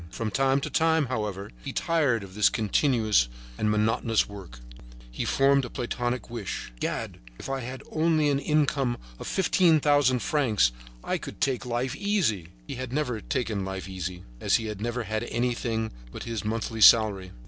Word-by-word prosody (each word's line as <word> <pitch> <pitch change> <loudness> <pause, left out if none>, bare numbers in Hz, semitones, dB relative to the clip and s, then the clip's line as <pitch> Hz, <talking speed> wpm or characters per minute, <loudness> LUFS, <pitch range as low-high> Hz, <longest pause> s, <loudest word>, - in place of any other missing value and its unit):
From 110 +4 -4
time 135 +5 +2
to - - -3
time, 160 -1 +3
however, 105 -6 -4 0.2
tired 145 -10 +1
of 95 -1 -11
this 105 -1 +4
continuous 110 - +2 0.3
and 105 - 0
monotonous 110 +1 +2
work, 95 -12 -10 0.5
he - - -3
formed 140 0 +3
a 125 - -5
platonic 120 0 -3
wish: 110 - -5
"Gad! - - -3 0.2
If - - -8
I 130 -1 -4
only 160 -1 +2
had 140 - +2
an 140 - -5
income 140 -5 +1 0.2
of - - -7
fifteen 175 -4 +3
thousand 145 -4 +3
francs, 110 - +2 0.3
I - - -1
would - - -8
take 130 -2 0
life 125 +2 -1
easy." 170 - 0 0.2
He - - -6
had 130 -1 -5
never 125 -6 -1
taken 115 -8 -2
life 95 0 -5
easy, 90 -1 -5 0.2
as - - +2
he 115 - 0
had 105 -2 -5
never 120 +2 -2
had 110 +1 -2
anything 120 -2 -1 0.2
but - - -7
his 115 -2 -4
monthly 115 +1 -3
salary. 100 -5 +6
120 Hz, 170 wpm, -27 LUFS, 105-135 Hz, 0.5 s, salary